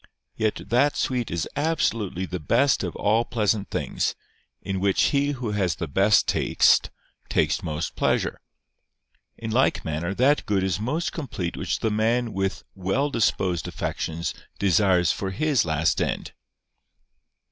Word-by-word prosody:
Yet 110 -1 -1
that 135 +5 +3
sweet 125 -3 -1
is 85 -2 -2
absolutely 115 - 0
the 90 0 -5
best 120 - +2
of 90 - -4
all 110 +3 +2
pleasant 110 -3 0
things, - - -1 0.4
in 95 -1 -3
which 100 0 +1
he 140 +1 +2
who 125 -5 -4
has 100 -4 0
the - - -4
best 95 +8 +3
taste - - +3 0.4
takes - - +1
most 75 +1 -4
pleasure. - - 0 1.0
In 110 -1 -5
like 130 +4 +2
manner 80 +5 -2
that 140 +6 +2
good 100 -2 +1
is 95 -1 0
most 145 +10 -2
complete 105 - -4
which - - -2
the 110 - +1
man 115 +2 +1
with 95 0 -2
well 100 +10 -1
disposed 95 - 0
affections 85 +1 -3 0.2
desires 95 -3 +3
for 95 - -3
his 140 - +1
last 80 0 +1
end. - - -2
105 Hz, 145 wpm, -25 LUFS, 90-120 Hz, 1.0 s, that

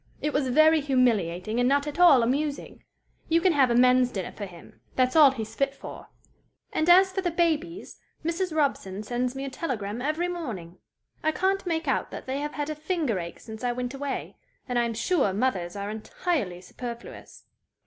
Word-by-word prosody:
It 300 - -2
was 280 -2 +1
very 310 +4 +5
humiliating, 225 - +1
and 245 +1 +3
not 285 +1 +2
at 295 +3 -5
all 295 -9 +7
amusing. 285 +4 -2 0.5
You 330 +1 +4
can 360 0 +3
have 270 -4 +4
a 235 - +2
men's 250 0 +5
dinner 190 -6 -4
for 205 - -7
him. 175 -2 -15
That's 255 +1 +2
all 305 -3 +9
he's 225 -4 -6
fit 275 +3 -1
for. - - -10 0.7
"And 315 +2 +1
as 380 +2 +7
for 385 - -2
the 360 - 0
babies, 335 +2 -1 0.3
Mrs. 345 +2 -1
Robson 270 -10 -1
sends 245 +3 -2
me 270 +1 -4
a - - -4
telegram 235 -7 -4
every 310 +6 0
morning. 225 - -6 0.4
I 315 - +3
can't 380 +3 0
make 325 -2 -1
out 265 - 0
that - - -8
they 265 +2 -2
have 295 +1 -4
had 295 0 -3
a - - -1
finger 305 - -1
ache 170 -1 -7
since 220 +1 -10
I 245 -1 +1
went 250 +1 -4
away, 275 0 -5 0.3
and 245 -2 0
I 240 - +2
am 230 -1 -3
sure 250 - +1
mothers 195 -5 -1
are 200 +1 -4
entirely 215 - -3
superfluous. 235 +5 -9
265 Hz, 195 wpm, -26 LUFS, 230-315 Hz, 0.7 s, all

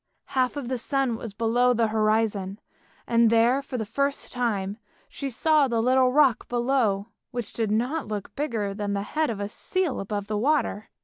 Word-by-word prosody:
Half 255 +1 +1
of 275 -4 -4
the 255 0 -2
sun 270 -1 0
was 225 -2 -8
below 240 +3 +3
the 230 -1 +2
horizon, 215 -3 +1 0.5
and 230 -1 +4
there 230 +4 +4
for 270 -2 -5
the 220 - -2
first 280 +6 -1
time 210 -4 -1 0.3
she 275 - -5
saw 300 +3 +3
the 235 -2 0
little 255 +2 +3
rock 275 -3 +3
below, 240 -4 +1 0.2
which 240 -3 -5
did 225 -2 -1
not 245 +8 0
look 210 -2 -5
bigger 225 -9 -2
than 205 0 -3
the 200 0 -1
head 305 +7 -1
of 220 -3 -3
a 200 - -2
seal 360 - -2
above 205 0 -3
the 210 0 -2
water. 265 -5 0
235 Hz, 185 wpm, -26 LUFS, 210-265 Hz, 0.5 s, and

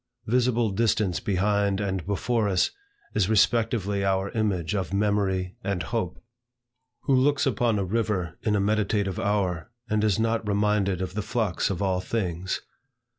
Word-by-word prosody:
Visible 120 -2 +2
distance 105 -3 +1
behind 100 0 +1
and 95 -3 -2
before 105 +2 0
us, 90 -2 +2 0.4
is 100 -2 +1
respectively 110 -2 +2
our 95 0 0
image 100 -6 -1
of 95 -3 -2
memory 100 -1 0
and 100 -3 -1
hope. 110 -7 -3 0.8
Who 140 - +1
looks 140 +2 +3
upon 120 -3 +1
a 100 - 0
river 95 -5 -1
in 105 -2 +1
a - - +2
meditative 100 -1 0
hour, 95 -4 0 0.2
and 110 -1 0
is 105 -2 +2
not 115 -1 0
reminded 100 -2 +1
of 90 - -5
the 105 - -2
flux 105 -3 -1
of 95 0 -2
all 95 -2 +1
things? 95 -3 -2
100 Hz, 150 wpm, -26 LUFS, 95-110 Hz, 0.8 s, looks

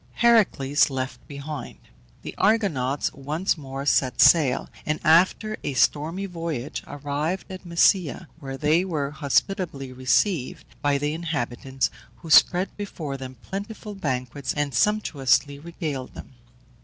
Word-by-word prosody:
HERACLES 195 - +3
LEFT 130 -2 -5
BEHIND. 145 +1 -7 0.5
The - - -6
Argonauts 160 - +1
once 150 +7 -1
more 135 -3 -7
set 130 -3 +2
sail, 145 -6 +5 0.2
and 150 0 -1
after 185 +6 +3
a 140 - -3
stormy 160 +9 +1
voyage 165 -7 -4
arrived 145 +6 -3
at 185 -1 -9
Mysia, 170 0 +2
where 135 -3 -6
they 155 +5 +2
were 150 -7 -2
hospitably 145 -1 -1
received 130 +4 0 0.2
by 145 -1 +2
the 145 +1 -1
inhabitants, 135 -5 -2 0.2
who 165 - -10
spread 180 +4 +5
before 165 -9 -5
them 130 -1 -8
plentiful 210 +2 -6
banquets 130 -6 -3
and 145 -2 -1
sumptuously 140 - +1
regaled 155 -5 -5
them. - - -10
150 Hz, 125 wpm, -24 LUFS, 135-180 Hz, 0.5 s, sail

